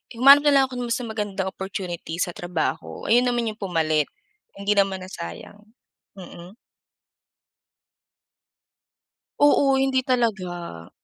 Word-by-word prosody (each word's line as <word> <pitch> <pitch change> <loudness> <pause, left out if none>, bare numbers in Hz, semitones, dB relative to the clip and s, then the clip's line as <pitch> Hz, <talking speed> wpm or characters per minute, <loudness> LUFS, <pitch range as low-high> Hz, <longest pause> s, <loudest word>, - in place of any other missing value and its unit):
humanap 275 +4 +8
na - - +6
lang 275 - +6
ako 250 - -5
ng 245 - -3
mas 235 +1 -2
magandang 205 -4 -3
opportunity 185 -4 -6
sa 175 +1 -1
trabaho. 160 - -4
Ayo'n 245 +2 +4
naman 240 -2 0
yung 215 - -15
pumalit, 160 -5 0 0.5
hindi 200 +1 -2
naman 195 -2 +1
nasayang. 185 - -9 0.6
Mm. 180 0 -12 2.8
Oo, 285 -2 +4
hindi 265 -1 +1
talaga. 185 - -2
200 Hz, 115 wpm, -23 LUFS, 175-245 Hz, 2.8 s, humanap